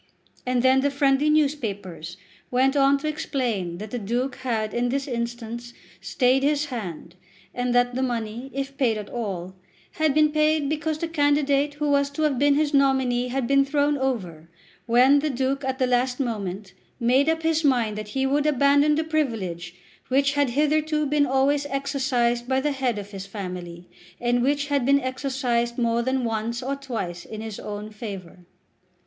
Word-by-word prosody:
And 250 -1 +1
then 260 +1 +5
the 285 - +2
friendly 280 +1 +2
newspapers 205 - -1 0.3
went 265 +3 +2
on 275 0 +4
to 305 - -4
explain 235 - -2
that 210 +2 -8
the 245 - -3
Duke 245 +5 -2
had 220 -4 -2
in 240 +1 0
this 275 +2 -2
instance 235 -1 -5 0.3
stayed 255 +1 +2
his 290 +1 +1
hand, 175 -7 -6 0.4
and 245 0 -1
that 245 0 +3
the 260 - -2
money, 240 0 -3
if 275 +1 -4
paid 235 -5 +2
at 210 -1 -7
all, 190 -6 -4 0.4
had 315 -3 0
been 305 -1 +4
paid 305 -1 +2
because 310 0 -1
the 335 - -3
candidate 290 -2 +1
who 295 0 -2
was 280 0 +2
to 285 +2 -3
have 285 -5 +1
been 285 0 +4
his 300 0 +1
nominee 265 -3 +2
had 260 0 -2
been 275 +2 +4
thrown 290 +1 +1
over, 190 - -3 0.4
when 255 +5 +5
the 305 +2 -1
Duke 270 +1 -1
at 265 0 -2
the 260 - +2
last 250 +1 +1
moment 205 -6 -4 0.3
made 260 +5 +3
up 325 0 0
his 320 0 +1
mind 240 -7 +2
that 215 0 -5
he 265 - +2
would 285 +2 +1
abandon 285 +1 +4
the 315 - 0
privilege 210 - -2 0.3
which 275 +2 +2
had 285 -2 +2
hitherto 305 +3 +1
been 290 0 +2
always 275 +2 +2
exercised 265 -4 0
by 260 0 +2
the 295 +2 0
head 260 -5 -1
of 205 0 -7
his 195 -1 -7
family, 180 -3 -7 0.3
and 245 0 +1
which 285 +3 +1
had 280 -3 +1
been 280 +2 +4
exercised 255 -3 -1
more 235 -1 +1
than 260 +1 0
once 230 +2 -2
or 275 +2 -2
twice 220 -11 -5
in 215 -1 -8
his 220 -2 -6
own 210 +1 -6
favour. 195 -5 -8
260 Hz, 180 wpm, -24 LUFS, 230-285 Hz, 0.4 s, then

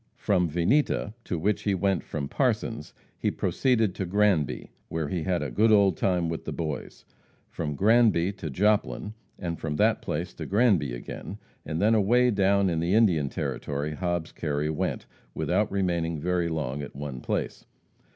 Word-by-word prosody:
From 90 -5 +1
Vinita, 105 - +1
to 90 - -2
which 100 +6 0
he 100 -2 0
went 95 -1 +1
from 70 -3 -4
Parsons, - - -1 0.3
he - - +1
proceeded 115 -7 +1
to 95 - -3
Granby, 95 -6 +1 0.2
where 80 -3 -2
he 90 0 -2
had 90 +1 0
"a - - -4
good 105 -4 +4
time 90 -2 +1
with 80 -1 -4
the - - -3
boys." 80 -3 -5 0.5
From 75 -3 -3
Granby 105 -2 +4
to 85 -5 -6
Joplin, 105 +5 +1 0.2
and 85 -3 -4
from 75 -2 -3
that - - +2
place 85 +4 -3
to - - -7
Granby 100 - +3
again, - - -7 0.3
and 80 - -2
then 110 +3 +4
away 120 +4 +4
down 100 -1 +3
in 85 -3 0
the 85 +4 +1
Indian 85 -11 +3
Territory 75 +2 -3
Hobbs 85 -1 -2
Kerry 75 -1 -2
went, 80 - -2 0.3
without - - 0
remaining 85 -4 0
very 90 +1 0
long 75 -4 -3
at 70 - -8
one 70 -2 -5
place. - - -3
90 Hz, 165 wpm, -27 LUFS, 80-100 Hz, 0.5 s, good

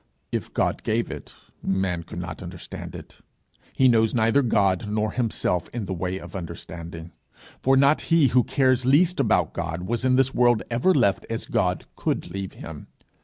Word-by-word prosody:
If - - -3
God - - 0
gave - - -1
it, - - -8 0.3
man 95 -3 -1
could 85 - -10
not 90 +2 -6
understand 85 -1 -8
it: - - -11 0.5
he 130 - +3
knows 115 -2 +3
neither 115 +4 +3
God 105 -5 +1
nor 105 0 0
himself 110 -7 -1
in 115 -4 -3
the 95 - -3
way 90 +1 -3
of - - -10
the 95 - -4
understanding. 85 0 -8 0.5
For 135 +1 +4
not 140 +3 +4
he 165 -5 +5
who 125 +1 +4
cares 130 -1 +2
least 155 +7 +3
about 100 - +2
God 85 +1 -4
was 115 +5 -2
in 130 0 +3
this 130 0 +2
world 120 -3 +3
ever 120 +11 +3
left 100 -9 +2
as 115 0 -3
God 110 - 0
could - - -2
leave 95 -1 -5
him. 80 -2 -9
110 Hz, 180 wpm, -24 LUFS, 90-130 Hz, 0.5 s, he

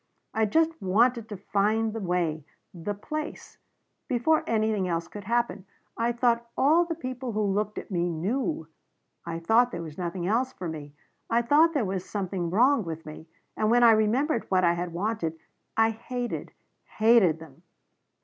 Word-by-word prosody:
I 220 0 +2
just 320 +5 +1
wanted 225 +4 +2
to 205 - -6
find 210 +3 0
the 225 - -4
way 175 -5 -1 0.3
the 190 +4 -4
place 305 +9 -6 0.5
before 275 +5 +2
anything 215 -4 +1
else 170 -1 -2
could 205 -1 -9
happen. 225 -5 -1 0.3
I 230 +1 +1
thought 235 -1 +1
all 320 +6 +4
the 335 -1 -3
people 255 -5 -5
who 215 0 0
looked 210 +1 -1
at - - -7
me 175 -1 0
knew. 185 - -2 0.6
I 165 -1 -3
thought 225 +9 +3
there 170 - -5
was 155 0 -9
nothing 175 0 -3
else 245 +7 +1
for 180 - -6
me 150 -3 -7 0.4
I 235 +1 +2
thought 310 +7 +4
there 260 -7 +2
was 190 -1 -2
something 190 -4 -3
wrong 240 +6 +4
with 165 -2 -6
me 155 +1 -10 0.3
and 215 - +1
when 240 +1 +5
I 235 - +8
remembered 230 +5 +1
what 185 -1 +3
I 170 -1 +4
had 175 0 -3
wanted 170 -3 -2 0.4
I 225 0 +4
hated 245 +2 -5 0.5
hated 215 -7 +5
them. 160 -2 -14
215 Hz, 170 wpm, -27 LUFS, 175-240 Hz, 0.6 s, I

